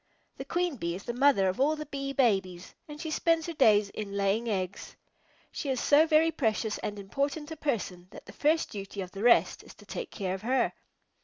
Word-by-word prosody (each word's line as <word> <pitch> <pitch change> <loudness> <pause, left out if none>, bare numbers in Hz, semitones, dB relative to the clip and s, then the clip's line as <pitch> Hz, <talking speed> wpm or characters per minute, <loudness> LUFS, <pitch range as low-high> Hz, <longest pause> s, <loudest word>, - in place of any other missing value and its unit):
The - - -6
Queen 350 -4 -1
Bee 170 -4 -3
is 195 - -8
the 240 - -4
mother 250 -6 +4
of 185 +4 -2
all 295 +4 +3
the 305 0 -6
Bee 275 -1 -4
Babies, 195 -9 0
and 300 0 -9
she 320 0 -5
spends 330 0 +1
her 335 - -4
days 215 -9 +4
in 200 -2 -5
laying 200 +4 +1
eggs. 190 -2 -4 0.6
She 285 - -4
is 260 -2 0
so 300 +5 +5
very 320 +1 +4
precious 220 -6 -1
and 205 - -4
important 280 +9 -3
a - - -4
person 205 - -3
that - - -13
the - - -12
first 315 +2 +1
duty 200 -1 -6
of 185 -1 -7
the 195 - -7
rest 240 +1 +4
is - - -15
to - - -17
take 475 - -6
care 190 -3 -3
of 190 - -5
her. 250 +2 +1
240 Hz, 220 wpm, -29 LUFS, 200-300 Hz, 0.6 s, so